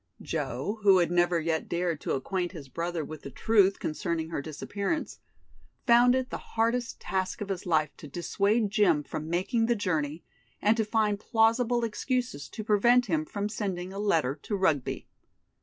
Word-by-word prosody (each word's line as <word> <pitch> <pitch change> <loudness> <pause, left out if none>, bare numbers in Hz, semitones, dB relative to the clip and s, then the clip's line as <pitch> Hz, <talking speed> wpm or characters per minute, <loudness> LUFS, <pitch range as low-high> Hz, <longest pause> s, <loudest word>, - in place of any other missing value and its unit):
Joe, 170 - -3
who 195 -2 +6
had 175 -1 +2
never 175 0 +3
yet 160 0 -1
dared 170 -2 -1
to - - -2
acquaint 175 +6 -2
his 145 -6 -9
brother 170 +2 -3
with 155 -1 -8
the - - -8
truth 200 - +3
concerning 160 0 -3
her 165 - -3
disappearance, 200 - -3 0.7
found 245 +1 +6
it 260 -1 -2
the - - -3
hardest 230 +2 -1
task 190 -1 -2
of 205 - -5
his 185 -2 -4
life 155 -3 +1
to - - -10
dissuade 200 - 0
Jim 185 -9 +3
from 155 +2 -6
making 225 +7 +1
the 240 - +2
journey 160 -6 -2 0.4
and 210 +2 +3
to 225 -1 0
find 210 -2 +1
plausible 230 +2 +2
excuses 230 - -2
to 215 - -6
prevent 235 +4 +4
him 160 -7 0
from 200 +5 -3
sending 190 -4 -4
a 200 - -5
letter 160 -9 +1
to 210 - -3
Rugby. 160 -9 0
190 Hz, 175 wpm, -28 LUFS, 165-220 Hz, 0.7 s, who